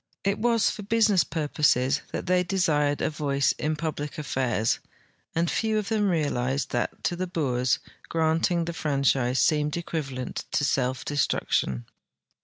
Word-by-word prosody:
* - - -40
It 200 +1 0
was 230 -1 +3
for - - -7
business 210 -2 +3
purposes 150 -3 +1
that - - -4
they 180 0 +3
desired 150 -6 +1
a - - +1
voice 140 -2 +1
in 155 +1 0
puldic 150 -2 -4
affairs, 130 -6 0 0.6
and 165 +1 +2
few 220 +4 0
of 210 -1 -2
them 210 -3 +2
realized 140 -5 0
that, 120 - -2
to 175 - 0
the 185 +1 -3
Boers, 130 -8 +1 0.3
granting 165 +1 +1
the 170 - -4
franchise 135 -5 +1
seemed 150 0 +2
equivalent 135 -7 -4
to 145 - +2
self 130 -2 0
destruction. 65 - 0
150 Hz, 150 wpm, -26 LUFS, 135-175 Hz, 0.6 s, was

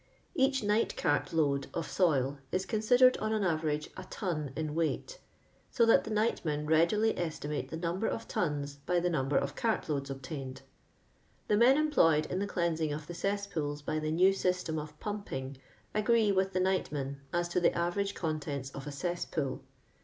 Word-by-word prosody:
Each 270 -2 +2
night 210 +2 +1
cart 145 0 +1
load 140 -4 +1
of 165 - -1
soil 145 -6 +1
is 185 +1 0
considered, 245 +5 +4
on 215 +1 -1
an 215 -2 +1
average, 155 -4 0
a 185 - -7
ton 160 - -3
in 155 -2 -3
weight, 165 - -2 0.5
so 235 - +3
that 230 - +5
the - - -5
nightmen 190 -9 0
readily 170 +8 +3
estimate 155 -3 -3
the 160 - -5
num 170 +2 -2
ber 225 - 0
of 225 - -3
tons 145 -4 -2
by 180 -1 +3
the 175 +1 0
number 135 -3 +1
of 140 +1 -1
cart 225 -1 0
loads 140 -2 -2
obtained* 135 -1 -6 0.9
The 210 - +4
men 250 +5 +6
employed 165 - +4
in 185 - -3
the 200 - -1
cleansing 165 -4 0
of 150 +1 -4
the 175 - -7
cess 200 +4 -1
pools 145 -6 -3
by 155 +1 -1
the 155 0 -2
new 180 +5 +4
system 180 -4 -1
of 150 0 -9
pumping 140 -11 -5 0.4
agree 215 0 +3
with 190 0 +1
the 185 - +1
nightmen 150 -7 -1
as 175 0 0
to 175 - +1
the 175 - +2
average 195 +4 -1
contents 145 -4 -3
of 140 +1 -8
a - - -4
cesspool. 145 -3 -3
170 Hz, 185 wpm, -31 LUFS, 150-200 Hz, 0.9 s, men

